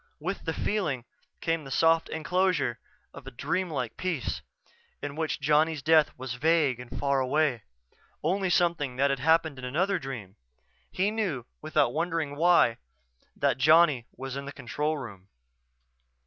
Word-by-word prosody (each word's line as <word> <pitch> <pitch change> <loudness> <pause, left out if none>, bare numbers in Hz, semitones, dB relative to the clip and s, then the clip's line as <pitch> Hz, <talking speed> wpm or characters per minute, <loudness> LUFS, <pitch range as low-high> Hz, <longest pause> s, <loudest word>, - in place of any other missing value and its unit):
With 180 +6 -4
the 160 - -1
feeling 155 - -1 0.4
came 165 -1 0
the 135 - -9
soft 165 +3 +3
enclosure 160 -6 0 0.3
of 140 -2 -12
a - - -3
dream 165 +8 -2
like 125 -7 -4
peace 175 -9 -2 0.6
in 145 0 -5
which 160 -1 -2
Johnny's 150 +1 +2
death 155 -1 +5
was 130 -1 -5
vague 145 -2 +2
and 125 -1 -9
faraway; 140 -1 +1 0.6
only 190 +4 +1
something 170 -7 +1
that 140 +2 +2
had 135 - -1
happened 160 -1 +2
in - - -10
another 180 +10 0
dream. 115 -8 -7 0.5
He 195 +3 +1
knew, 185 - -2 0.2
without 155 -1 +1
wondering 165 -3 -1
why, 165 -7 +4 0.6
that - - +1
Johnny 150 -4 +5
was 135 0 -5
in 140 0 -5
the 140 - -6
control 145 +4 -2
room. 100 -8 -9
150 Hz, 150 wpm, -28 LUFS, 130-165 Hz, 0.6 s, death